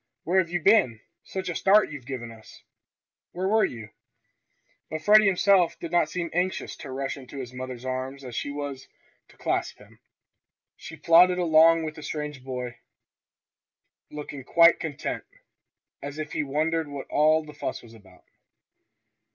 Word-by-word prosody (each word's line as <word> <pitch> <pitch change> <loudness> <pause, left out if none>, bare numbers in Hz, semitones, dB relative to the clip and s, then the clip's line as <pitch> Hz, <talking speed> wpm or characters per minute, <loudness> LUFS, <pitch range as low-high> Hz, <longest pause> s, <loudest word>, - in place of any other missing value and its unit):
"Where 180 +4 +2
have 170 -3 0
you 175 0 -1
been! 170 - +3 0.2
Such 190 -1 -6
a 175 - -2
start 200 +4 +4
as - - -9
you've 130 -4 -10
given 120 -4 -6
us! 110 -1 -15 0.7
Where 185 +2 -2
were 215 +2 +3
you?" 110 -3 -4 1.0
But 155 0 -5
Freddie 210 +1 +6
himself 190 -2 +3
did 170 - -6
not 170 -3 +2
seem 170 -1 -3
as 175 - +2
anxious 185 +1 -3
to 140 - -9
rush 135 +1 -4
into 135 +1 -11
his 125 -2 -7
mother's 130 -1 -7
arms 130 +1 -4
as 125 -3 -8
she - - -3
was 140 -2 -6 0.4
to - - -22
clasp - - -2
him. - - -19 0.8
He 160 - -10
plodded 170 +4 +5
along 165 -1 +5
with 155 -1 -4
the 155 - -11
strange 150 -3 -5
boy, 125 -2 -6 1.3
looking 145 -2 -8
quite 170 +5 +5
content, 155 -4 -4
and - - -28 0.7
as 145 - -11
if 155 0 -5
he - - 0
wondered 155 +3 -1
what 140 -1 -7
all 155 +1 +3
the 150 - -11
fuss - - -5
was 115 -1 -15
about. 95 -5 -19
150 Hz, 170 wpm, -26 LUFS, 130-170 Hz, 1.3 s, Freddie